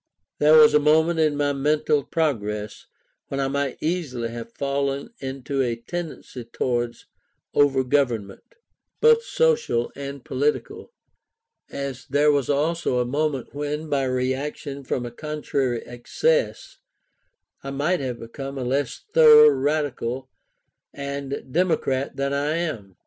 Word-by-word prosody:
There 150 +1 +6
was 150 -1 +8
a 150 - +6
moment 160 +3 +3
in 155 -2 +2
my 145 0 +1
mental 150 +1 +1
progress 105 -11 -2 0.4
when 135 - -4
I 135 - +1
might 140 -1 -2
easily 150 -9 -2
have 115 0 -8
fallen 140 - -2
into 135 +1 -3
a 120 -3 0
tendency 145 0 -7
towards 120 0 -2 0.5
over 135 -2 +3
government, 120 -7 -1 0.4
both 460 0 +6
social 470 - +1
and 140 -1 -7
political; 145 +3 -2 0.8
as 135 -2 -6
there 145 +2 +4
was 140 -3 0
also 150 -1 0
a 125 - +1
moment 140 0 -2
when, 150 +2 -4
by 140 -2 +1
reaction 135 +2 -3
from 125 -1 -2
a 120 - -6
contrary 140 -3 -2
excess, 480 - -1 0.9
I 135 - -5
might 150 +6 0
have 125 -3 -3
become 135 +4 -7
a 130 - -3
less 130 0 -2
thorough 455 -1 +9
radical 135 - -1 0.6
and 140 0 -5
democrat 155 -6 0
than 140 0 -1
I 145 +2 0
am. 120 - -4
140 Hz, 130 wpm, -24 LUFS, 130-150 Hz, 0.9 s, thorough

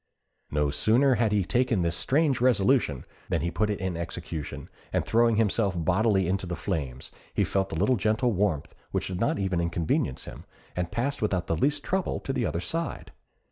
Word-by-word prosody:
No 75 -1 +1
sooner 120 - +4
had 115 -2 +2
he 105 -2 +2
taken 120 -4 +1
this 85 -1 0
strange 140 - +2
resolution 120 - +3 0.2
than - - +1
he 85 - -1
put 105 +4 0
it 105 - -2
in 95 -1 -2
execution, 85 -2 -5 0.2
and - - 0
throwing 115 0 +3
himself 105 -3 +2
bodily 95 +3 +2
into 95 +1 -1
the 85 - -3
flames, 70 -5 -4 0.2
he - - +3
felt 95 0 0
a - - -3
little 105 +9 +2
gentle 110 +5 +1
warmth 95 -7 0 0.2
which - - -2
did 90 -1 -4
not 115 - +1
even 95 -3 0
inconvenience 85 -6 -1
him, - - -10 0.3
and 90 -1 -1
passed 140 +4 -1
without 95 -5 0
the 80 - 0
least 140 - +1
trouble 190 -1 -1
to 135 - -3
the 120 - 0
other 85 - -2
side. 165 - -3
100 Hz, 190 wpm, -27 LUFS, 85-120 Hz, 0.3 s, sooner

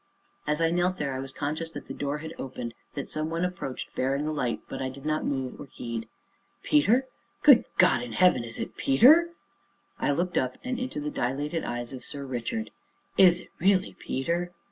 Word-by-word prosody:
As 150 +2 +1
I 165 0 +3
knelt 180 +1 +1
there, 140 -4 -2
I 130 - -3
was 135 0 -6
conscious 155 +4 -3
that - - -8
the - - -5
door 140 +1 -2
had 160 - -6
opened, 125 -3 -5 0.2
that 140 - -4
some 155 +1 -2
one 165 +2 0
approached, 175 -8 -5
bearing 135 +3 0
a 155 - -1
light, 125 -6 -1
but - - -5
I 130 - -1
did 135 +2 -11
not 155 0 0
move 130 -2 -3
or - - -8
heed. 115 -3 -5 0.6
"Peter? 225 - +4 0.4
good 280 -5 +8
God 125 - +5
in 120 -2 -6
heaven! 180 -5 +4
is 115 -1 -7
it - - -5
Peter?" 300 - +6 0.7
I - - +1
looked 175 +5 +1
up 130 0 -2
and 255 -1 -2
into 255 -11 -3
the 150 0 -3
dilated 145 +7 -1
eyes 120 +1 -4
of 130 - -7
Sir 140 -1 -4
Richard. 130 - -3 0.4
"Is 180 -2 +6
it - - -16
really 190 +1 +3
Peter?" 170 +6 -2
150 Hz, 200 wpm, -27 LUFS, 130-175 Hz, 0.7 s, good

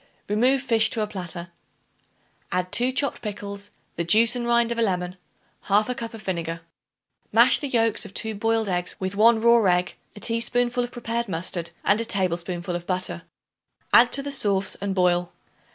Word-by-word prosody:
Remove 250 +6 +2
fish 225 -4 +2
to 230 - -2
a - - 0
platter. 180 -4 -5 1.0
Add 180 0 -2
2 250 +2 +1
chopped 265 0 0
pickles, 200 -1 -7 0.3
the 170 - 0
juice 225 +7 +4
and 240 -1 -3
rind 235 0 +3
of 235 - -2
a - - +3
lemon, 180 -4 -1 0.5
1/2 210 +5 +2
cup 230 -1 -6
of 215 - -11
vinegar. 170 -3 -4 0.7
Mash - - +5
the 290 - -3
yolks 230 -4 +1
of 205 - -9
2 220 +2 -2
boiled 225 +1 0
eggs 180 -1 -2
with 190 0 -3
1 225 +2 +5
raw 235 0 +4
egg, 180 0 0 0.2
a - - -10
teaspoonful 240 +2 +1
of 245 - -6
prepared 235 -2 -3
mustard 170 0 -1
and 210 +3 +2
a - - -2
tablespoonful 180 -3 -2
of 175 0 -6
butter. 185 - -2 0.7
Add 235 +1 +7
to 275 - +5
the 285 - -4
sauce 200 -7 0
and 200 -1 -2
boil. 180 -1 +1
210 Hz, 180 wpm, -24 LUFS, 180-235 Hz, 1.0 s, Add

